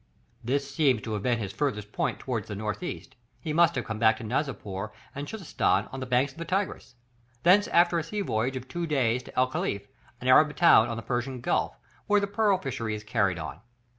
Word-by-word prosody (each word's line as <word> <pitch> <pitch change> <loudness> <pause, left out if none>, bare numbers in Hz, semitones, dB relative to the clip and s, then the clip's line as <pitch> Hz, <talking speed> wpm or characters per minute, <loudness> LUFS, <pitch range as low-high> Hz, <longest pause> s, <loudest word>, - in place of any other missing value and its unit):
This 140 +3 0
seems 135 -8 +2
to 110 - -4
have 105 - -2
been 120 +2 +1
his 100 -4 -5
farthest 105 -6 -2
point - - -1
towards 115 -6 -4
the 105 - -5
north 105 - -3
east; 155 -6 -6 0.2
he 155 -3 -4
must 170 +1 +4
have 130 - -2
come 110 -1 -4
back 110 -1 +4
to 115 - -8
Nizapur 110 -5 -3 0.2
and 140 +1 -5
Chuzestan 200 -4 0
on 135 - -6
the 130 - -5
banks 125 +2 +2
of 135 - -16
the 170 - -4
Tigris; 185 -7 -2 0.5
thence 195 +4 +5
after 170 0 +4
a - - -3
sea 205 +6 -3
voyage 125 - -1
of 130 0 -6
two 175 +3 -3
days 125 -5 +1
to - - -14
El 130 0 +3
Cachif, 100 -5 -2 0.3
an 125 - -5
Arabian 150 +4 +6
town 120 -9 +6
on 115 - -3
the 115 - -6
Persian 125 +1 -2
Gulf, 120 - -1 0.3
where 205 0 +4
the 200 - 0
pearl 200 -1 +2
fishery 120 - -3
is 105 - -7
carried 100 -5 +1
on. 80 0 -6
130 Hz, 225 wpm, -27 LUFS, 110-160 Hz, 0.5 s, Arabian